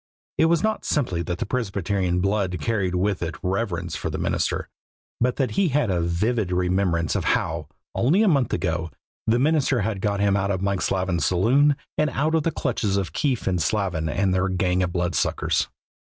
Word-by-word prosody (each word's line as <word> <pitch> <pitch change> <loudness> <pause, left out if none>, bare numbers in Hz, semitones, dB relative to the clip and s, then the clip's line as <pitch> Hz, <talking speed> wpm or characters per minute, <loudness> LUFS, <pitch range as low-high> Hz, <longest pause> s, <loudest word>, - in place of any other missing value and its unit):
It - - +6
was 165 0 +2
not 220 0 0
simply 95 - 0
that 85 +1 -3
the - - -2
Presbyterian 95 -5 -1
blood 100 -2 0
carried 95 0 -1
with 100 +1 0
it 80 -2 -3
reverence 90 -4 -2
for 75 - -3
the - - -4
minister, - - -1 0.5
but 125 +1 +1
that 130 -5 0
he 195 - +2
had 145 -7 +1
a 90 -2 +1
vivid 95 +4 0
remembrance 90 -2 +1
of - - 0
how, 80 -2 0 0.3
only 170 - +3
a - - +3
month 140 -8 +2
ago, 85 -2 -1 0.4
the 115 +1 +4
minister 140 -2 +2
had 100 -1 -2
got 100 -1 0
him 100 -1 +3
out 100 0 0
of 95 -2 0
Mike 100 -1 -1
Slavin's 90 -6 0
saloon 130 +11 +3 0.2
and 150 0 +3
out 150 +4 0
of 160 - +3
the 165 - 0
clutches 110 -9 -1
of 90 -7 -2
Keefe 130 - 0
and 90 -2 0
Slavin 90 -8 0
and 95 +4 +1
their 95 +1 +1
gang 90 0 +1
of 90 -1 0
bloodsuckers. 85 -3 0
95 Hz, 195 wpm, -24 LUFS, 90-125 Hz, 0.5 s, It